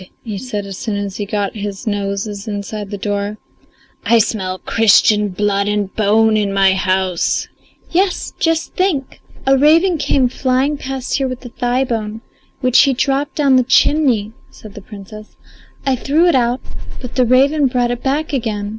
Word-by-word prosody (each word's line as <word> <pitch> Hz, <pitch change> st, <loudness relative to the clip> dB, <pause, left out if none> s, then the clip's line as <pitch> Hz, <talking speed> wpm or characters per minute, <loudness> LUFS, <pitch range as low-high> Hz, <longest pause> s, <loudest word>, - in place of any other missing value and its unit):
he 215 Hz, -3 st, -5 dB
said 210 Hz, -1 st, -5 dB
as 195 Hz, -1 st, -8 dB
soon 215 Hz, -3 st, -3 dB
as 200 Hz, -1 st, -4 dB
he 205 Hz, -, -4 dB
got 205 Hz, -1 st, -2 dB
his 205 Hz, 0 st, -6 dB
noses 200 Hz, 0 st, -3 dB
inside 205 Hz, 0 st, -5 dB
the 205 Hz, -, -5 dB
door. 205 Hz, +1 st, -3 dB, 0.7 s
"I 235 Hz, -, +4 dB
smell 190 Hz, -4 st, -1 dB
Christian 210 Hz, 0 st, +3 dB
blood 200 Hz, +1 st, 0 dB
and 205 Hz, -2 st, -2 dB
bone 220 Hz, +1 st, +3 dB
in 205 Hz, -2 st, 0 dB
my 195 Hz, -1 st, +3 dB
house." 190 Hz, -2 st, 0 dB, 0.4 s
"Yes, 370 Hz, +2 st, 0 dB
just 330 Hz, 0 st, 0 dB
think! 335 Hz, -8 st, -1 dB, 0.2 s
A 270 Hz, 0 st, +4 dB
raven 320 Hz, +5 st, +4 dB
came 270 Hz, -3 st, +2 dB
flying 260 Hz, +3 st, 0 dB
past 270 Hz, -2 st, -3 dB
here 270 Hz, -, 0 dB
with 255 Hz, 0 st, -7 dB
a -, -, -7 dB
thigh 245 Hz, +2 st, 0 dB
bone, 225 Hz, -3 st, -4 dB, 0.4 s
which 255 Hz, -2 st, +4 dB
he 275 Hz, -1 st, +5 dB
dropped 275 Hz, +3 st, -1 dB
down 275 Hz, -3 st, +3 dB
the -, -, +5 dB, 0.2 s
chimney," 250 Hz, -9 st, +1 dB, 0.2 s
said 215 Hz, -2 st, -13 dB
the 205 Hz, -, -10 dB
Princess. 210 Hz, +1 st, -12 dB, 0.5 s
"I 270 Hz, -1 st, +2 dB
threw 290 Hz, +7 st, +1 dB
it 345 Hz, -, +4 dB
out, 245 Hz, 0 st, +1 dB, 0.4 s
but 250 Hz, -2 st, -8 dB
the 255 Hz, -, +2 dB
raven 275 Hz, +4 st, +3 dB
brought 245 Hz, -1 st, 0 dB
it 245 Hz, 0 st, -4 dB
back 290 Hz, +3 st, -1 dB
again. 215 Hz, -6 st, -2 dB
225 Hz, 170 wpm, -17 LUFS, 205-270 Hz, 0.7 s, he